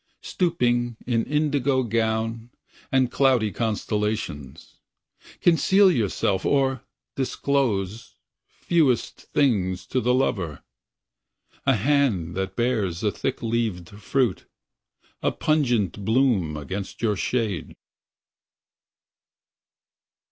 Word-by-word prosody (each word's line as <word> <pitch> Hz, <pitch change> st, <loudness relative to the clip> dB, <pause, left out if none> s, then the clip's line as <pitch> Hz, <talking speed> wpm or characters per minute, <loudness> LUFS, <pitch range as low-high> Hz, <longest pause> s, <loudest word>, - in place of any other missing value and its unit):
Stooping 120 Hz, -, 0 dB
in 115 Hz, -2 st, 0 dB
indigo 145 Hz, -3 st, +1 dB
gown 115 Hz, 0 st, -1 dB, 0.4 s
And 130 Hz, -2 st, +2 dB
cloudy 130 Hz, -6 st, +3 dB
constellations. 105 Hz, -, -3 dB, 0.6 s
Conceal 190 Hz, +3 st, +5 dB
yourself 100 Hz, -, 0 dB
or 135 Hz, -3 st, +1 dB, 0.3 s
disclose 115 Hz, -6 st, -1 dB, 0.3 s
Fewest 155 Hz, -8 st, 0 dB
things 95 Hz, -10 st, +1 dB
to 130 Hz, -, -1 dB
the 125 Hz, -, +1 dB
lover— 85 Hz, -, -1 dB, 1.0 s
A 135 Hz, -, +5 dB
hand 115 Hz, -, +1 dB
that 95 Hz, +1 st, -3 dB
bears 110 Hz, -8 st, -1 dB
a 105 Hz, -, +2 dB
thick 130 Hz, +3 st, -3 dB
leaved 110 Hz, -7 st, -1 dB
fruit, 105 Hz, +2 st, -1 dB, 0.8 s
A -, -, +1 dB
pungent 120 Hz, -, 0 dB
bloom 110 Hz, -, +2 dB
against 95 Hz, +9 st, -6 dB
your 105 Hz, -2 st, +2 dB
shade. 105 Hz, -5 st, -2 dB
115 Hz, 90 wpm, -24 LUFS, 100-135 Hz, 1.0 s, Conceal